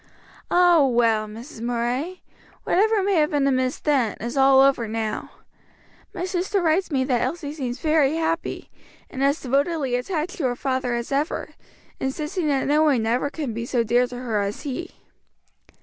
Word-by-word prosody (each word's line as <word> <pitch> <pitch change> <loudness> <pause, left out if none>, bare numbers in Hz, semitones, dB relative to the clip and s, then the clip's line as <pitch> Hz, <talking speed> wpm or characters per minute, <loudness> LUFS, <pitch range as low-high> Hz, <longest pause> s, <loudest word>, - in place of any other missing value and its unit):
"Ah, 350 -3 +5
well, 230 -4 +2
Mrs. 225 +3 -10
Murray, 245 +9 -2 0.4
whatever 425 +1 +2
may 400 +1 +1
have 300 -1 +3
been 290 -2 +1
amiss 255 -1 +1
then, 265 -8 0
is 235 +4 -5
all 270 0 +5
over 270 -4 +3
now. 220 0 -3 0.8
My 360 - -4
sister 375 +2 -1
writes 345 +2 +1
me 270 -4 +1
that 255 -3 0
Elsie 290 +2 -3
seems 255 -4 -4
very 305 -1 +2
happy, 330 0 -2 0.4
and 265 - -3
as 280 +3 +2
devotedly 280 +1 0
attached 325 +8 -3
to 315 - -2
her 245 -1 0
father 260 -1 -1
as 235 +2 -4
ever, 285 +3 -1 0.5
insisting 305 +6 -2
that 275 -2 +1
no 295 +2 +3
one 275 -8 +3
ever 245 +5 0
can 285 -6 -4
be 230 +1 -4
so 245 -2 +1
dear 245 +2 +2
to 245 - -8
her 230 -4 -1
as 200 +1 -4
he." 330 +5 -5
275 Hz, 170 wpm, -23 LUFS, 245-315 Hz, 0.8 s, Ah